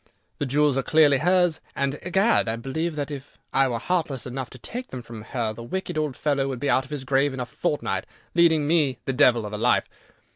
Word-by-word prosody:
The 145 - -1
jewels 145 0 +2
are - - +2
clearly 145 -1 +4
hers, 175 0 +2
and, 140 +1 -1
egad, 190 - +2
I 110 - 0
believe 155 +8 -3
that 145 0 -3
if 140 -1 -8 0.2
I 135 0 +4
were 120 -2 -1
heartless 155 -3 -1
enough 130 0 -5
to - - -12
take 245 - -6
them 130 -2 -7
from 115 -2 -9
her, 110 0 -3
the 115 - -9
wicked 180 +8 -4
old 150 -4 -1
fellow 140 -3 0
would 130 -3 -4
be 145 - +1
out 130 - +2
of - - -16
his 145 -3 -4
grave 135 +1 +1
in - - -6
a 125 - -2
fortnight, 145 +4 -2 0.3
leading 165 -3 +4
me 150 -6 +2
the 135 - -1
devil 125 -5 +4
of 105 - -6
a 105 - -3
life. 120 +2 +2
140 Hz, 230 wpm, -25 LUFS, 125-155 Hz, 0.3 s, clearly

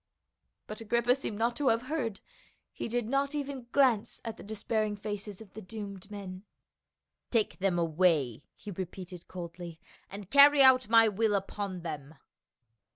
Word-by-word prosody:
But 215 +1 -8
Agrippa 235 +2 +2
seemed 245 -6 -5
not 235 +2 0
to 290 - 0
have 230 0 +3
heard; 255 -7 -3 0.5
he - - -5
did 240 -1 -2
not 275 +3 0
even 275 -4 -5
glance 240 -5 +2
at 225 -1 -4
the - - -13
despairing 215 0 -2
faces 205 0 -6
of 210 -3 -14
the 220 - -8
doomed 200 -1 -8
men. 190 -3 -8 0.9
"Take 225 -4 0
them 190 -2 +1
away," 160 -7 +2
he 210 - -9
repeated 180 -1 -7
coldly, 170 -2 -8 0.3
"and 200 0 -9
carry 285 0 +8
out 255 -3 +6
my 225 0 +7
will 215 0 +1
upon 195 -1 -4
them." 155 -2 -7
210 Hz, 155 wpm, -30 LUFS, 185-235 Hz, 0.9 s, carry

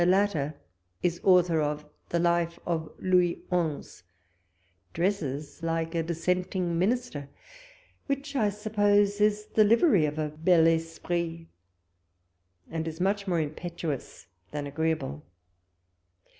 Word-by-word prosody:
latter 180 -5 +2 0.5
is 175 -1 0
author 180 -4 +5
of 150 0 -2 0.2
the 170 - 0
Life 170 0 +1
of 160 -2 -2
Louis 180 -2 +2
Onze; 165 - -2 0.9
dresses 155 -6 -2
like 165 0 -1
a 165 - +1
dissenting 175 +1 -1
minister, 195 - -1 0.8
which 280 +1 -3
I 215 -6 +3
sup 210 +2 -7
pose 205 0 +4
is 210 0 +2
the 215 - +6
livery 210 - +4
of 150 +1 -5
a 155 -1 -1
bii 165 +1 +4
esprit, 165 0 -3 1.3
and 160 0 -3
is 160 0 -6
much 200 +2 0
more 175 -3 +1
impetuous 155 - -4 0.2
than 145 -1 -4
agreeable. 145 - -2
170 Hz, 115 wpm, -28 LUFS, 160-195 Hz, 1.3 s, the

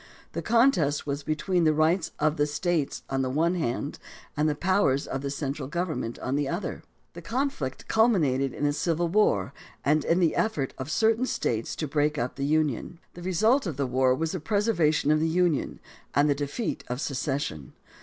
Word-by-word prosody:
The - - -3
contest 215 - +3
was 140 0 -2
between 165 +4 0
the 155 -1 +3
rights 160 +3 +2
of 155 +1 +1
the 145 0 +2
States 155 0 -1
on 135 0 -1
the 130 - -1
one 160 +6 +1
hand 145 -4 -2 0.4
and 150 +1 +2
the 150 - -1
powers 170 -5 +2
of 135 - -4
the 140 - -3
central 140 -1 -3
government 165 -7 -3
on 130 - -2
the 145 -1 0
other. 175 +3 -3 0.3
The 170 - -9
conflict 215 - -3
culminated 155 - +2
in - - -6
the 145 0 +2
Civil 170 +2 0
War 165 - +2 0.3
and 150 +2 +3
in 170 - +2
the 170 -3 +2
effort 155 -12 0
of 130 +2 -5
certain 225 +8 +2
States 115 - -2
to 155 - -3
break 150 +1 +1
up 120 0 -2
the 140 - -2
Union. 155 +1 0 0.2
The 175 - -10
result 215 +8 +2
of 155 -6 -4
the 140 - 0
war 130 0 +2
was 160 +3 -2
the 185 - -3
preservation 165 -6 +2
of 155 - +3
the 160 - +1
Union 175 -3 +1 0.4
and 145 +2 +4
the 145 - +4
defeat 145 - -3
of 125 +1 -3
secession. 135 - -3
155 Hz, 195 wpm, -27 LUFS, 140-175 Hz, 0.4 s, and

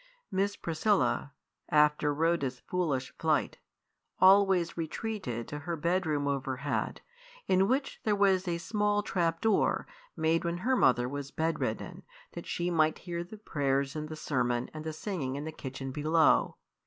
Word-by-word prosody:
Miss 200 +1 0
Priscilla, 170 -3 0 0.4
after 150 0 +3
Rhoda's 145 -4 0
foolish 150 -8 -2
flight, - - +1 0.6
always 190 -2 +5
retreated 165 - -4
to 145 - -5
her 170 +3 -3
bedroom 160 -3 0
overhead, 140 0 -2 0.5
in 190 +1 +4
which 270 +4 -1
there 210 -1 +2
was 195 -2 +3
a 170 -1 0
small 205 +3 0
trap 165 -4 0
door, 220 -2 +2 0.3
made 160 +1 +2
when 170 0 -1
her 260 +1 +3
mother 125 - +3
was 140 +1 -5
bedridden, 160 +2 -2 0.3
that - - -8
she 175 0 -1
might 155 -2 +2
hear 170 -1 -5
the 195 +5 -11
prayers 140 -8 -1
and 155 0 -4
the 155 - -5
sermon 125 -5 -1
and 155 0 -7
the 160 - -2
singing 155 -5 -4
in 145 - -4
the 160 - -4
kitchen 135 -2 -6
below. 155 +3 +3
160 Hz, 150 wpm, -30 LUFS, 145-185 Hz, 0.6 s, always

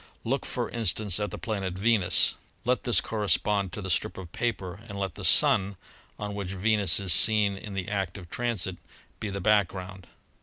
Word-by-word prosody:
"Look, - - -1
for - - -2
instance, 110 -4 +1
at 105 - -1
the - - -7
planet 100 -6 -3
Venus; 100 -2 +3 0.3
let 125 +1 +1
this 120 - +4
corre 105 -2 -3
spond 100 +2 +2
to 105 - -6
the 95 - -4
strip 110 +5 0
of 90 -3 -8
paper 100 -5 -3
and 100 - -6
let 95 -3 -2
the - - -9
Sun, 95 0 +4 0.4
on 105 0 -5
which 100 -2 -4
Venus 105 0 +2
is 95 -4 +2
seen 105 +2 +5
in 100 +1 -8
the 95 -2 -3
act 95 -3 -2
of 90 -3 -10
transit, 115 -7 -2 0.4
be 105 - -3
the 100 0 -4
background. 95 -3 0
100 Hz, 190 wpm, -27 LUFS, 95-105 Hz, 0.4 s, seen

